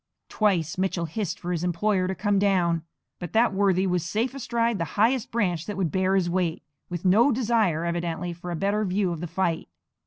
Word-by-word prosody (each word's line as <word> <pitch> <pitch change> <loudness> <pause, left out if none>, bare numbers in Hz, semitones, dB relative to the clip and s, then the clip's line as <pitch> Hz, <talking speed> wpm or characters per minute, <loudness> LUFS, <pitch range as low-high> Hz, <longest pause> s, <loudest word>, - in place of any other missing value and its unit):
Twice 185 -6 0
Mitchell 185 -2 0
hissed 180 +3 -3
for 175 - -4
his 170 -1 -2
employer 185 +2 +1
to 190 - -2
come 205 +1 +1
down; 180 -4 +2 0.4
but 175 - -7
that 225 0 +3
worthy 190 -1 +2
was 180 -3 0
safe 220 +9 -1
astride 235 -4 -1
the - - +1
highest 230 +3 +2
branch 180 -8 -1
that 205 -2 -4
would 180 -6 0
bear 190 0 +1
his 185 -3 +2
weight, 175 -3 -1 0.3
with 175 +1 -5
no 220 +9 +5
desire 220 -9 +1
evidently 170 0 -2
for 175 +1 -8
a 175 - -2
better 200 +5 0
view 190 -1 0
of 170 - -4
the 175 - -3
fight. 170 -1 -1
185 Hz, 205 wpm, -25 LUFS, 175-210 Hz, 0.4 s, no